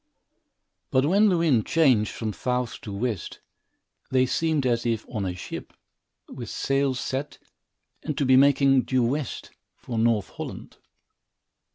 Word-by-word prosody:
But 130 +1 +2
when 200 +7 +4
the 180 - +2
wind 145 -10 +2
changed 130 -10 +3
from 110 -2 -4
south 125 0 -2
to 105 - -7
west, 100 -2 -3 0.7
they 130 -1 +3
seemed 155 +1 0
as 120 -2 +1
if 115 -2 -1
on 105 -5 -3
a 90 - -4
ship, 90 - -8 0.5
with 120 -4 -8
sails 135 -2 0
set, 135 +3 -4 0.6
and 150 -4 -4
to 140 - +1
be 130 0 +5
making 135 0 +5
due 130 0 0
west, 135 +2 -3 0.2
for 115 -2 -5
North 115 -3 +2
Holland. - - -8
130 Hz, 145 wpm, -25 LUFS, 115-140 Hz, 0.7 s, be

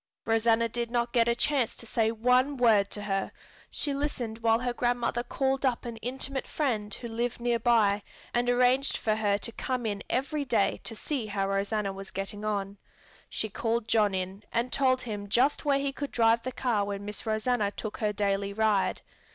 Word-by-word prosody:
Rosanna 225 +1 +3
did 235 +1 -3
not 235 0 -1
get 235 -2 +4
a 235 - +3
chance 260 -1 +1
to - - -8
say 225 -1 +1
one 250 +5 +2
word 215 -5 +4
to 205 - -5
her. 195 -1 -1 0.4
She 290 - -2
listened 255 -6 -3
while 225 -1 +3
her 245 0 -2
grandmother 240 0 0
called 270 +2 -1
up 255 -2 +1
an 235 -1 -5
intimate 265 +3 -3
friend 220 -9 -1
who 235 - -4
lived 235 +1 -2
near 235 -1 +1
by 220 -4 +3 0.3
and 245 0 +1
arranged 250 +2 +3
for 215 - 0
her 205 -2 +2
to 230 - -5
come 250 +1 -3
in 205 -2 -2
every 285 +3 0
day 235 -7 +1
to 225 - -3
see 250 -1 -3
how 200 -2 -1
Rosanna 200 +1 -1
was 195 0 -8
getting 195 +2 -5
on. 200 -1 -2 0.5
She 220 - -2
called 225 +2 -1
John 210 -4 +3
in 190 +2 -4
and 235 +2 -1
told 260 -2 +2
him 205 -3 -5
just 255 +8 +2
where 280 -1 +3
he 275 0 -1
could 285 0 -4
drive 230 0 +4
the 255 - -4
car 235 -4 0
when 200 0 -4
Miss 210 +2 -5
Rosanna 220 0 +1
took 210 +1 -6
her 210 -2 0
daily 200 -1 -1
ride. 215 -2 +1
230 Hz, 195 wpm, -29 LUFS, 210-250 Hz, 0.5 s, get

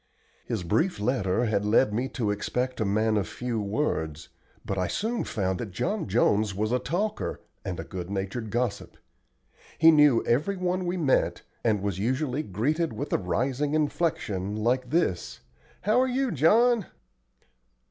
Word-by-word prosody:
His 110 -6 -2
brief 160 - +1
letter 105 -1 +1
had 105 -2 +1
led 105 +1 +3
me 125 +5 -1
to 110 -7 -1
expect 125 +4 -2
a - - +2
man 110 +2 +2
of 100 - 0
few 120 -3 -3
words, 80 - -2 0.4
but 95 - -2
I 90 -2 0
soon 225 - -1
found 95 -3 -2
that 115 - -4
John 125 - -2
Jones 105 -1 +2
was 110 +3 -1
a 125 - +2
talker 195 - -2 0.2
and 90 0 -4
a - - -3
good 90 -1 -6
natured 100 +3 -3
gossip. 120 -2 -2 0.8
He 165 +1 +7
knew 150 -6 +5
every 155 +12 +1
one 180 0 -1
we 180 +1 -1
met, 145 -6 +1 0.2
and 105 -4 +1
was 100 -2 -2
usually 130 +5 0
greeted 150 - -1
with 145 - -4
a - - +3
rising 130 +10 -1
inflection, 120 - -1
like 120 +4 0
this, 135 - -1 0.4
"How 215 +5 +3
are 260 - +2
you, 260 0 0
John?" 220 - +4
120 Hz, 160 wpm, -27 LUFS, 100-155 Hz, 0.8 s, He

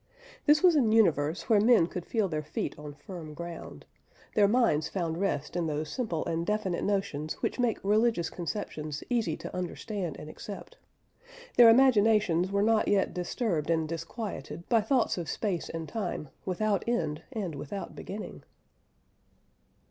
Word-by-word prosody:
This 300 +2 +5
was 355 -3 +7
an 245 -7 +3
universe 165 -7 +3
where 215 -3 +5
men 225 -5 +6
could 175 0 -6
feel 220 -4 +1
their 155 -3 -2
feet 150 - -3
on 150 -1 -8
firm 160 -3 -9
ground; 170 0 -8 0.5
their 205 -2 +5
minds 210 -10 +2
found 170 -3 -2
rest 150 -6 -1
in 175 -2 0
those 155 0 -2
simple 215 -11 -2
and 165 0 -1
definite 195 -2 -1
notions 155 -7 -1
which - - -1
make 240 -3 +2
religious 215 -3 +2
conceptions 155 -5 -5
easy 225 -10 +1
to - - -7
understand 180 0 -4
and - - -9
accept; 205 - -9 0.8
their 240 -2 +9
imaginations 210 -7 +4
were 200 0 +2
not 220 0 +3
yet 200 -1 +2
disturbed 180 - -1
and 160 -1 +1
disquieted 170 +2 -6
by 230 -2 +4
thoughts 220 -3 +1
of 165 -2 -5
space 190 -3 -2
and 165 -1 -5
time 200 -9 -4 0.2
without 200 +2 0
end 155 -11 -1
and 205 -9 -3
without 150 +8 -6
beginning. 210 +2 -7
190 Hz, 155 wpm, -29 LUFS, 165-220 Hz, 0.8 s, their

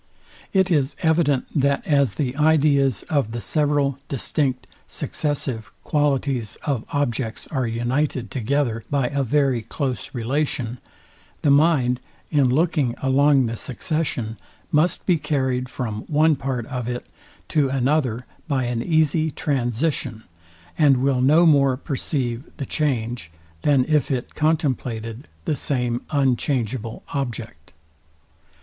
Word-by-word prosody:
It 190 -1 +2
is 145 -4 +2
evident, 160 -5 +3
that 140 -2 +1
as 140 -8 +2
the 130 -3 -1
ideas 145 -6 +3
of 140 -8 -1
the 120 - -3
several 145 0 +1
distinct, 135 -1 -1 0.2
successive 130 -8 -3
qualities 135 -6 0
of 135 -7 -1
objects 125 -5 -2
are 130 -5 0
united 120 +3 -1
together 125 -2 0
by 140 -4 +1
a 140 0 -1
very 135 -1 +2
close 130 +3 -4
relation, 125 -1 -1 0.6
the 145 - +4
mind, 140 -4 +4 0.3
in 140 -5 +4
looking 145 -3 +1
along 135 0 +4
the 115 0 -2
succession, 125 -3 -3 0.3
must 155 +3 +2
be 175 -4 +3
carryed 130 -4 -1
from 110 -5 -4
one 155 +1 +4
part 130 -3 -3
of 125 -1 -4
it 125 0 -4 0.4
to 145 -4 +2
another 130 -2 0 0.2
by 135 -4 +1
an 120 -1 -1
easy 160 +1 +2
transition, 130 -4 -1 0.6
and 145 -4 +6
will 130 0 +1
no 155 +6 +5
more 140 -5 +4
perceive 130 -3 -2
the 140 - -3
change, 120 - -1 0.3
than 140 -3 +3
if 155 -2 +2
it 130 -3 -2
contemplated 130 -7 -1 0.2
the 150 - +1
same 125 -4 -1
unchangeable 130 -4 0
object. 115 - -5
135 Hz, 125 wpm, -23 LUFS, 120-150 Hz, 0.6 s, and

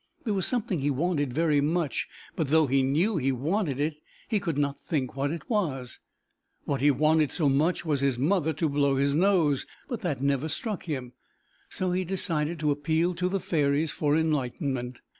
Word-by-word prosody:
There 220 - -1
was 190 -2 0
something 215 -8 -1
he 140 +1 0
wanted 145 -1 0
very 150 +1 +2
much, 155 -2 -1 0.3
but, 160 - -1
though 160 +2 +4
he 135 0 +2
knew 165 +10 +1
he 135 -2 +1
wanted 145 - -1
it, 150 +1 -1 0.3
he 215 - +1
could 165 -7 -3
not 140 -1 -1
think 135 -5 -2
what 140 +1 0
it 165 +2 -5
was. 145 - -2 0.7
What 140 -3 -1
he 145 - +5
wanted 155 +1 +3
so 155 - +1
much 150 +7 +1
was 145 -4 0
his 135 -3 +1
mother 160 +4 +1
to 160 +2 0
blow 140 -1 +2
his 140 +1 +2
nose, 165 -5 +2 0.2
but 235 -3 -4
that 170 -9 -2
never 140 +2 0
struck 210 - -4
him, 130 -7 -4 0.6
so 185 -1 -1
he 185 +1 0
decided 170 -3 -1
to 150 -1 +2
appeal 160 +5 +1
to 180 +1 -1
the 195 +1 0
fairies 150 -2 +1
for 150 0 +1
enlightenment. 135 -4 -1
150 Hz, 190 wpm, -27 LUFS, 140-175 Hz, 0.7 s, he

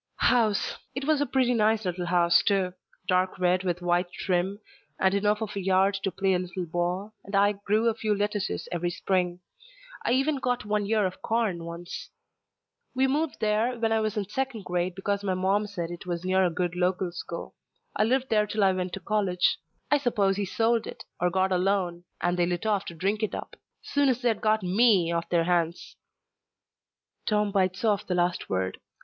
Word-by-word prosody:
"House. 225 -5 +2 0.2
It 270 +1 -3
was 305 -1 +2
a 290 - +1
pretty 255 -2 +2
nice 220 -1 +2
little 180 -1 -2
house, 175 0 +4
too. 195 -3 +1 0.3
Dark 185 +1 +1
red 180 0 +2
with 180 -1 -2
white 175 0 +1
trim, 185 +2 -1 0.4
and 190 0 +3
enough 210 +2 +1
of 210 -1 -6
a - - -1
yard 190 +1 +3
to 195 - 0
play 195 +1 +1
a 180 - +2
little 180 0 -4
ball, 175 +5 -2
and 200 +1 -5
I 200 +1 +5
grew 210 +3 0
a 230 - +3
few 215 -1 -1
lettuces 205 -1 -2
every 175 0 -1
spring. 180 0 -1 0.6
I - - +1
even 275 +3 +2
got 245 -2 -1
one 210 -1 0
ear 215 -1 +2
of 185 - -4
corn 215 -7 -1
once. 170 +1 -7 0.9
We 260 +1 +3
moved 295 +3 -1
there 220 +3 +1
when 225 -1 0
I 225 - +3
was 215 0 -1
in 200 -2 -1
second 235 -2 -3
grade 180 0 -1
because 200 +1 -2
my 190 -2 0
mom 195 +3 +1
said 175 -5 -5
it 175 +1 -8
was 175 0 -3
near 190 0 +3
a - - +2
good 175 +1 -2
local 180 0 0
school. 170 0 -7 0.4
I - - +3
lived 260 +4 +1
there 210 -1 +3
till 210 0 0
I 190 - +5
went 185 -1 -3
to - - -4
college. 190 -2 +1 0.3
I 290 - +5
suppose 210 -7 +1
he 200 0 -1
sold 225 +4 +1
it, - - -8 0.2
or 180 0 +2
got 190 +1 +1
a 180 - +2
loan, 180 -2 0
and 175 0 0
they 175 - +3
lit 175 +3 -2
off 205 -2 +1
to 170 - -7
drink 200 +6 -1
it 215 - -1
up. - - -7 0.3
Soon's 265 -4 +1
they'd 230 -3 +1
got 215 -1 +2
me 190 -2 +4
off 170 0 -2
their 170 -1 +3
hands." 170 -1 -1 1.3
Tom 210 -1 +2
bites 190 +1 0
off 210 -2 +1
the 180 - 0
last 175 0 0
word. 95 0 -1
195 Hz, 205 wpm, -27 LUFS, 180-215 Hz, 1.3 s, I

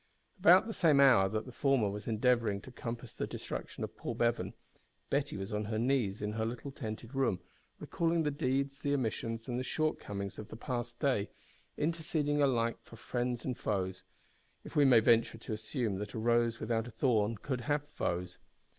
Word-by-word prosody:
About 185 +1 +7
the 225 - -4
same 155 -8 +4
hour 125 -9 +6
that 110 +2 -2
the 130 - -9
former 135 -4 +2
was 105 +1 -5
endeavouring 115 -2 +2
to 130 - -11
compass 120 -1 -6
the - - -3
destruction - - -5
of - - -5
Paul - - -4
Bevan, 120 0 0 0.6
Betty - - 0
was 95 +2 -5
on 105 0 -1
her 110 +1 -2
knees 115 -5 +1
in 105 - -1
her 110 +1 -2
little 120 +5 -4
tented 115 -2 -6
room, 130 -9 +1 0.4
recalling 165 0 0
the 150 - +1
deeds, 140 -1 -1
the 145 0 +1
omissions, 115 -2 -2
and 125 -1 -2
the - - -2
shortcomings 105 -10 -2
of 105 - -7
the - - -9
past 120 0 -4
day, 130 -8 +1 0.5
interceding 155 -2 0
alike 115 -4 +2
for - - -14
friends 120 +1 -2
and 125 - -1
foes 95 -2 -1 0.6
if - - -11
we 145 - +6
may 125 -4 +7
venture 115 0 +4
to 110 - -6
assume 110 -2 -2
that 105 0 -5
a - - -2
rose 120 +1 +2
without 115 +1 -1
a - - -8
thorn 115 -2 +1
could 125 +3 -3
have 145 +2 -1
foes! 90 -10 -3
120 Hz, 190 wpm, -33 LUFS, 110-135 Hz, 0.6 s, About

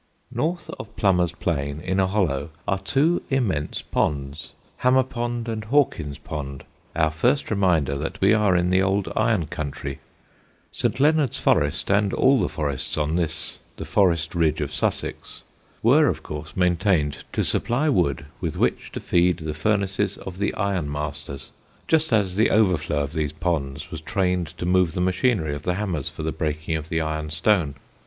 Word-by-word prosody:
North 155 +6 -2
of - - -9
Plummer's 90 -4 +2
Plain, 70 -4 -2
in 95 +3 -1
a 95 - +3
hollow, 85 -8 0 0.2
are 100 -1 +1
two 145 - +2
immense 105 - -1
ponds, 70 +1 -2 0.3
Hammer 130 +1 +4
Pond 120 -2 -3
and 110 -1 -3
Hawkin's 110 - +1
Pond, 70 -3 -6 0.3
our 80 -1 +2
first 125 - +1
reminder 85 -9 +2
that 80 - -4
we 95 +3 +5
are 105 -4 +3
in 90 +1 +2
the 95 +1 +4
old 95 0 0
iron 110 -8 +2
country. 70 -2 -5 0.7
St. - - -1
Leonard's 150 -2 +3
Forest, 75 +6 +1
and 100 0 +2
all 135 -1 +4
the 90 - 0
forests 70 -4 -2
on 75 +1 0
this 80 -3 -3 0.2
the - - -5
forest 85 -5 +2
ridge 80 -3 +1
of 75 - -3
Sussex, - - -3 0.4
were 145 +7 +6
of - - -1
course 75 +2 -7
maintained 90 -5 +1
to - - +1
supply 130 +7 0
wood 80 - +1
with - - -3
which - - 0
to - - -3
feed 90 0 +2
the 80 -3 -4
furnaces 100 +3 0
of 95 0 -8
the 100 - +1
iron 95 -8 -1
masters 75 -1 -5 0.4
just 160 -2 +2
as 100 -5 +2
the 110 +3 +3
overflow 85 -8 +2
of 70 +2 -6
these 75 -3 -1
ponds 70 -4 -2
was 80 - -6
trained 90 0 0
to 90 - -3
move 90 -2 +3
the - - -3
machinery 90 - +1
of 75 - -5
the 90 +3 -1
hammers 95 -8 -2
for - - -7
the 80 - -1
breaking 80 +1 -2
of 80 0 -5
the 85 -2 0
iron 80 -1 -3
stone. 80 -2 +2
90 Hz, 175 wpm, -24 LUFS, 75-105 Hz, 0.7 s, were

